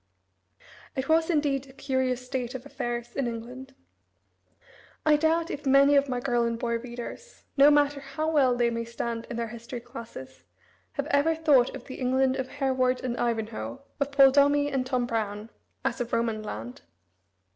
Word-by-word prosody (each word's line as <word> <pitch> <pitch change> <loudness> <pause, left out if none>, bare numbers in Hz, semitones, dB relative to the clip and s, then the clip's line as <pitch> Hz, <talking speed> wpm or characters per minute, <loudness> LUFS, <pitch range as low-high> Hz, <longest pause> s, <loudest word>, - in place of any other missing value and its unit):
It 265 +1 -2
was, 320 +1 +3
indeed, 285 -4 +1
a - - -14
curious 260 -2 -1
state 250 -1 -3
of 260 +1 -7
affairs 240 -3 -4
in 270 -3 0
England. 250 +3 -7 1.3
I 305 -1 +6
doubt 325 +2 +1
if 290 - -5
many 275 +2 +6
of 280 0 +3
my 250 -1 -1
girl 245 -1 +1
and 235 0 -1
boy 235 -1 -1
readers, 245 - -9
no 280 +1 +7
matter 290 -1 +3
how, 275 +3 -4
well 265 -5 +4
they 240 -1 +2
may 230 0 -2
stand 235 0 -4
in 235 - -4
their 230 -1 -2
history 235 +2 -7
classes, 230 - -10 0.5
have - - -2
ever 285 +3 +3
thought 295 -6 +3
of - - -9
the 260 - -8
England 260 +1 +2
of 260 -1 -2
Hereward 260 -2 0
and 245 -2 -2
Ivanhoe, 230 +3 -3 0.2
of 280 0 -1
Paul 275 -1 +7
Dombey 285 +1 +4
and 260 -2 -1
Tom 255 -2 0
Brown, 215 -2 -3 0.3
as 255 -2 -1
a - - 0
Roman 230 -2 -1
land. 115 - -7
255 Hz, 175 wpm, -27 LUFS, 235-280 Hz, 1.3 s, no